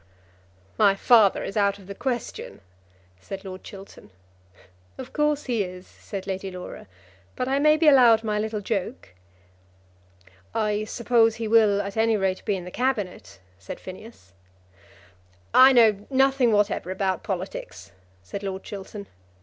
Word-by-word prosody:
"My 200 Hz, -2 st, +5 dB
father 215 Hz, -1 st, +4 dB
is -, -, -6 dB
out 200 Hz, -1 st, +1 dB
of 195 Hz, -, -16 dB
the 200 Hz, -, -7 dB
question," 240 Hz, -, -5 dB, 0.6 s
said 195 Hz, -, -8 dB
Lord 185 Hz, 0 st, -8 dB
Chiltern. 195 Hz, -, -12 dB, 0.9 s
"Of -, -, -9 dB
course 300 Hz, -1 st, +1 dB
he 235 Hz, -5 st, -1 dB
is," 180 Hz, 0 st, -9 dB
said 195 Hz, -2 st, -9 dB
Lady 195 Hz, 0 st, -4 dB
Laura, 180 Hz, -, -9 dB, 0.5 s
"but 255 Hz, -, -2 dB
I 270 Hz, +1 st, +1 dB
may 305 Hz, +1 st, +4 dB
be 315 Hz, 0 st, +2 dB
allowed 240 Hz, -6 st, +6 dB
my 210 Hz, -1 st, -1 dB
little 215 Hz, 0 st, -3 dB
joke." 200 Hz, -, -4 dB, 1.5 s
"I 215 Hz, -1 st, 0 dB
suppose 225 Hz, 0 st, +2 dB
he 230 Hz, -1 st, -4 dB
will 215 Hz, -2 st, +4 dB
at 200 Hz, +2 st, -7 dB
any 225 Hz, 0 st, +2 dB
rate 190 Hz, -1 st, -1 dB
be 205 Hz, -, 0 dB
in 180 Hz, -2 st, -6 dB
the 180 Hz, -, -8 dB
Cabinet," 205 Hz, -, -3 dB, 0.2 s
said 95 Hz, -, -8 dB
Phineas. 185 Hz, -, -12 dB, 1.2 s
"I 260 Hz, +1 st, +8 dB
know 220 Hz, -5 st, +4 dB
nothing 265 Hz, -2 st, +3 dB
whatever 205 Hz, -3 st, 0 dB
about 190 Hz, 0 st, -1 dB
politics," 175 Hz, -, -6 dB, 0.3 s
said 195 Hz, -, -7 dB
Lord 190 Hz, -1 st, -5 dB
Chiltern. 200 Hz, 0 st, -8 dB
210 Hz, 145 wpm, -24 LUFS, 190-235 Hz, 1.5 s, I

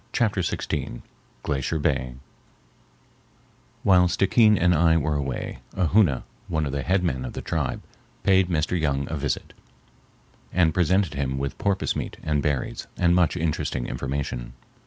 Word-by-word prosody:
Chapter 105 Hz, -5 st, +1 dB
XVI -, -, -3 dB, 0.4 s
Glacier 70 Hz, +2 st, -1 dB
Bay 65 Hz, -5 st, -1 dB, 1.7 s
While 90 Hz, -2 st, +5 dB
Stickeen 105 Hz, +4 st, +4 dB
and 90 Hz, +1 st, +3 dB
I 80 Hz, 0 st, +4 dB
were 75 Hz, -1 st, 0 dB
away, 70 Hz, -3 st, -3 dB, 0.2 s
a 90 Hz, -4 st, +1 dB
Hoona, 90 Hz, -11 st, +3 dB, 0.2 s
one 80 Hz, -2 st, 0 dB
of 70 Hz, -, -3 dB
the 70 Hz, 0 st, -2 dB
head 90 Hz, +5 st, +1 dB
men 65 Hz, -7 st, -1 dB
of 60 Hz, -, -6 dB
the -, -, -5 dB
tribe, 75 Hz, -6 st, -2 dB, 0.4 s
paid 95 Hz, -1 st, +4 dB
Mr. 85 Hz, +1 st, 0 dB
Young 70 Hz, -2 st, 0 dB
a -, -, -1 dB
visit, 70 Hz, -2 st, -3 dB, 1.0 s
and 85 Hz, -3 st, +3 dB
presented 90 Hz, 0 st, +2 dB
him 65 Hz, -2 st, -2 dB
with 70 Hz, 0 st, -3 dB
porpoise 100 Hz, -1 st, 0 dB
meat -, -, -4 dB
and 75 Hz, -2 st, 0 dB
berries 70 Hz, -4 st, -2 dB
and 85 Hz, 0 st, +3 dB
much 90 Hz, -3 st, +2 dB
interesting 75 Hz, -6 st, -1 dB
information. 65 Hz, -3 st, -4 dB
80 Hz, 150 wpm, -25 LUFS, 70-90 Hz, 1.7 s, While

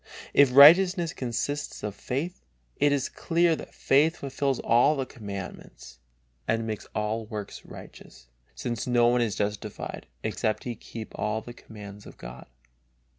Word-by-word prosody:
If 135 Hz, -3 st, +5 dB
righteousness 170 Hz, +4 st, +8 dB
consists 135 Hz, +4 st, -3 dB
of 105 Hz, -, -3 dB
faith, 145 Hz, -, -4 dB, 0.4 s
it 145 Hz, 0 st, +3 dB
is 140 Hz, -2 st, +1 dB
clear 170 Hz, 0 st, +1 dB
that -, -, -10 dB
faith 155 Hz, +5 st, +3 dB
fulfils 140 Hz, -1 st, -1 dB
all 135 Hz, +4 st, +3 dB
commandments 100 Hz, -, -9 dB, 0.5 s
and 115 Hz, 0 st, 0 dB
makes 110 Hz, -2 st, -5 dB
all 110 Hz, +1 st, -2 dB
works 105 Hz, -2 st, -7 dB
righteous, -, -, -13 dB, 0.3 s
since 120 Hz, -, -4 dB
no 120 Hz, -1 st, +4 dB
one 120 Hz, 0 st, +2 dB
is 110 Hz, -4 st, 0 dB
justified 105 Hz, 0 st, -4 dB, 0.2 s
except 110 Hz, -1 st, -1 dB
he 120 Hz, -, -3 dB
keep 115 Hz, 0 st, -9 dB
all 110 Hz, +1 st, -2 dB
the 120 Hz, -, -10 dB
commands 105 Hz, -3 st, -11 dB
of -, -, -13 dB
God. -, -, -10 dB
120 Hz, 140 wpm, -27 LUFS, 105-140 Hz, 0.5 s, righteousness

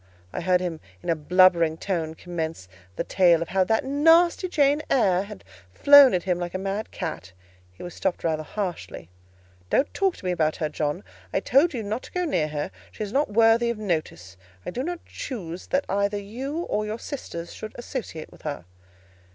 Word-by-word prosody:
I -, -, -3 dB
heard 180 Hz, -1 st, +2 dB
him 170 Hz, -3 st, -3 dB, 0.2 s
in -, -, 0 dB
a -, -, +2 dB
blubbering 170 Hz, 0 st, +4 dB
tone 165 Hz, -4 st, -2 dB
commence 160 Hz, -, -5 dB, 0.3 s
the -, -, -2 dB
tale 175 Hz, -3 st, +4 dB
of 170 Hz, -, -12 dB
how 190 Hz, 0 st, +3 dB
"that 220 Hz, +3 st, +1 dB
nasty 330 Hz, +6 st, +4 dB
Jane 290 Hz, -2 st, +3 dB
Eyre" 190 Hz, -9 st, +3 dB
had 145 Hz, -, -9 dB, 0.3 s
flown 285 Hz, -6 st, +8 dB
at 180 Hz, -, -1 dB
him 180 Hz, -2 st, 0 dB
like 175 Hz, 0 st, -4 dB
a -, -, +1 dB
mad 195 Hz, +3 st, -3 dB
cat: 90 Hz, +4 st, -6 dB, 0.4 s
he 90 Hz, -, -12 dB
was 175 Hz, -1 st, -7 dB
stopped 190 Hz, -2 st, -2 dB
rather 160 Hz, -2 st, 0 dB
harshly— 170 Hz, -, -5 dB, 0.6 s
"Don't 275 Hz, -, +1 dB
talk 385 Hz, -2 st, +1 dB
to -, -, -12 dB
me 180 Hz, -, +1 dB
about 155 Hz, -3 st, +1 dB
her, 155 Hz, -, -2 dB
John: 150 Hz, -5 st, -2 dB, 0.3 s
I -, -, +1 dB
told 280 Hz, +4 st, +3 dB
you 230 Hz, -, -3 dB
not 215 Hz, +4 st, -3 dB
to -, -, -13 dB
go 360 Hz, 0 st, -1 dB
near 175 Hz, -, 0 dB
her; 150 Hz, +4 st, -4 dB, 0.2 s
she -, -, -5 dB
is 205 Hz, +1 st, -6 dB
not 285 Hz, -2 st, +2 dB
worthy 225 Hz, +2 st, +4 dB
of 235 Hz, -, -2 dB
notice; 155 Hz, -, -3 dB, 0.3 s
I -, -, -4 dB
do 245 Hz, -, -3 dB
not 350 Hz, +4 st, -5 dB
choose 185 Hz, -, -7 dB
that 280 Hz, +1 st, 0 dB
either 200 Hz, +1 st, 0 dB
you 255 Hz, +10 st, -5 dB
or 215 Hz, -, -1 dB
your 210 Hz, +1 st, -4 dB
sisters 175 Hz, -, -7 dB
should 215 Hz, -, -8 dB
associate 240 Hz, -, -6 dB
with -, -, -17 dB
her." 145 Hz, -, -5 dB
190 Hz, 200 wpm, -25 LUFS, 165-245 Hz, 0.6 s, flown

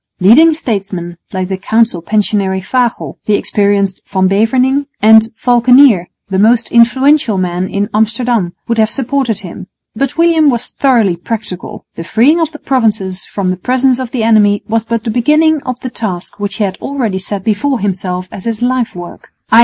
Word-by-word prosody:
Leading 300 Hz, -, +5 dB
statesmen 195 Hz, -, -4 dB
like 185 Hz, -2 st, -3 dB
the 190 Hz, 0 st, -4 dB
Council 220 Hz, -3 st, +1 dB
Pensionary 200 Hz, 0 st, -1 dB
Fagel, 240 Hz, +5 st, -2 dB
the 210 Hz, -, +3 dB
experienced 200 Hz, -2 st, 0 dB
Van 190 Hz, -1 st, +1 dB
Beverningh, 255 Hz, +8 st, +1 dB
and 220 Hz, +1 st, +5 dB
Valckenier, 245 Hz, -5 st, +4 dB, 0.2 s
the 190 Hz, -1 st, -1 dB
most 230 Hz, +3 st, +2 dB
influential 245 Hz, 0 st, +3 dB
man 180 Hz, 0 st, -2 dB
in 200 Hz, +1 st, -2 dB
Amsterdam, 220 Hz, -3 st, 0 dB
would 230 Hz, -1 st, -1 dB
have 220 Hz, 0 st, +3 dB
supported 255 Hz, -3 st, -1 dB
him. 185 Hz, 0 st, -9 dB, 0.3 s
But 275 Hz, +5 st, -2 dB
William 330 Hz, -3 st, +3 dB
was 240 Hz, -2 st, -2 dB
thoroughly 230 Hz, -10 st, +1 dB
practical. 190 Hz, -1 st, -6 dB
The 165 Hz, -, -7 dB
freeing 245 Hz, -, +2 dB
of 320 Hz, -1 st, -1 dB
the 300 Hz, -, -9 dB
Provinces 215 Hz, -9 st, -1 dB
from 190 Hz, -3 st, -2 dB
the 185 Hz, -, -3 dB
presence 255 Hz, +4 st, +1 dB
of 255 Hz, -2 st, -4 dB
the 240 Hz, -2 st, -2 dB
enemy 210 Hz, -2 st, +3 dB
was 225 Hz, 0 st, -1 dB
but 230 Hz, -1 st, -2 dB
the 225 Hz, -, -2 dB
beginning 300 Hz, +6 st, +2 dB
of 255 Hz, -1 st, -3 dB
the 255 Hz, -, -6 dB
task 200 Hz, -5 st, -5 dB
which 200 Hz, -1 st, -3 dB
he 215 Hz, -, -1 dB
had 195 Hz, -2 st, -3 dB
already 235 Hz, -9 st, -2 dB
set 195 Hz, 0 st, -5 dB
before 235 Hz, +6 st, 0 dB
himself 185 Hz, -2 st, -3 dB
as 190 Hz, -, -9 dB
his 230 Hz, 0 st, -3 dB
life 250 Hz, -3 st, -1 dB
work, 175 Hz, -1 st, -10 dB, 0.2 s
_i. 225 Hz, -, +7 dB
220 Hz, 175 wpm, -13 LUFS, 195-250 Hz, 0.3 s, i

